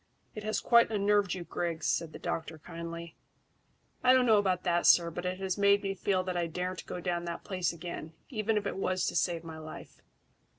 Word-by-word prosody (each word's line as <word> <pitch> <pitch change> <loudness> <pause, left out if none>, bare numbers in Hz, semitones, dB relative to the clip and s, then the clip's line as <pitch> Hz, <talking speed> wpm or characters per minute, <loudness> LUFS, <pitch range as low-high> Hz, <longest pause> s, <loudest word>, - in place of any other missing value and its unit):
"It 215 - -6
has 215 +1 0
quite 235 -1 +5
unnerved 205 -2 +2
you, 180 - -5
Griggs," 170 -1 -3
said 165 -2 0
the - - -8
doctor 160 0 -4
kindly. 170 +1 -7 0.9
"I 255 0 +7
don't 255 -1 +5
know 220 -3 +6
about 185 -3 0
that, 175 -1 +2
sir, 170 -1 +6
but 175 +2 -4
it 185 0 -2
has 190 +1 -2
made 200 0 +4
me 195 0 -1
feel 190 -1 0
that 185 -1 -3
I 175 -1 0
daren't 180 +2 -4
go 180 - -4
down 175 -1 -2
that 170 0 -5
place 185 -3 -1
again, 165 -1 -7
even 220 -3 0
if 205 - -1
it - - -3
was 185 -1 0
to - - -2
save 170 -2 +1
my 160 -1 -8
life. 155 0 -10
180 Hz, 215 wpm, -31 LUFS, 170-200 Hz, 0.9 s, I